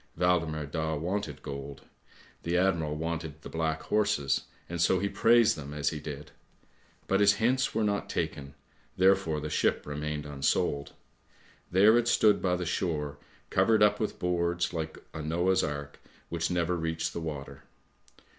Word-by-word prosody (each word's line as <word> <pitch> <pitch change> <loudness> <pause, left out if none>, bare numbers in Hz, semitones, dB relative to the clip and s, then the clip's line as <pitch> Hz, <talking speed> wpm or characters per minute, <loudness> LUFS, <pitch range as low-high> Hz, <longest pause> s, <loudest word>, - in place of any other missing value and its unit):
Waldemar 85 -4 +1
Daa 80 +2 -2
wanted 85 -1 -3
gold; 70 0 -7 0.6
the 85 +2 0
admiral 85 -5 +1
wanted 80 -1 -4
the - - -8
black 80 -1 -2
horses, 100 -10 +1 0.2
and 85 -1 -3
so 95 +2 +4
he 100 +2 0
praised 115 +3 +4
them 70 -1 -8
as 75 - +1
he 75 - -5
did; 75 0 -8 0.7
but 95 - +1
his 100 0 +6
hints 130 +3 +1
were 110 - +2
not 100 -1 -1
taken, 70 0 -3 0.4
therefore 95 -4 +3
the 75 - -4
ship - - +1
remained 75 0 -4
unsold. 70 0 -1 0.8
There 105 +6 +6
it 120 - -1
stood 105 -3 +4
by 90 -1 +1
the 90 0 -3
shore 75 -4 -2 0.3
covered 105 +3 +4
up 105 0 +4
with 110 - -2
boards, 90 0 0
like 80 -2 -4 0.2
a 80 - -5
Noah's 85 +5 +1
Ark 70 -1 -5 0.3
which 85 -1 -1
never 90 0 0
reached 80 -1 -2
the 85 - -4
water. 75 -4 -7
85 Hz, 155 wpm, -29 LUFS, 75-95 Hz, 0.8 s, his